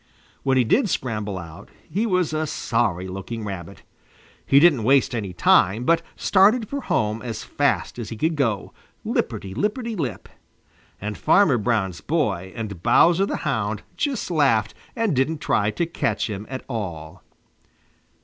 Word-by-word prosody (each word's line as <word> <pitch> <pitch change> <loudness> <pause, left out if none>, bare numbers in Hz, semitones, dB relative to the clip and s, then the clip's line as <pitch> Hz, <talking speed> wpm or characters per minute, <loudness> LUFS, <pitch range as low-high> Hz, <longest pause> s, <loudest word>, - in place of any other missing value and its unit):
When 135 -1 +1
he 125 - +5
did 210 - +2
scramble 105 - -2
out, 80 -3 -10 0.2
he 205 +9 -1
was 180 -5 +1
a 155 0 -1
sorry 105 -10 -1
looking 95 +5 -6
Rabbit. 95 -2 -7 0.6
He 135 - +6
didn't 150 -6 +5
waste 135 +2 +3
any 105 -5 -3
time, 95 +4 +3
but 165 +5 +3
started 210 +4 +3
for 280 +4 -4
home 110 - -1
as 115 -3 -5
fast - - -1
as 110 -3 -5
he 115 - -6
could 160 +6 0
go, 115 -9 -1 0.3
lipperty 95 -1 -2
lipperty 220 - -2
lip. 140 - -4 0.7
And 105 +1 -5
Farmer 160 - +4
Brown's 105 -6 -1
boy 100 - -1
and 105 -6 -6
Bowser 175 - +4
the - - -2
Hound 105 -1 -1
just 280 -10 -2
laughed 120 -9 +2 0.2
and 225 - 0
didn't 135 +5 +1
try 105 -7 +1
to 170 +10 -1
catch 170 - -1
him 105 +1 -6
at 130 -1 -6
all. 90 - -6
120 Hz, 155 wpm, -23 LUFS, 100-165 Hz, 0.7 s, He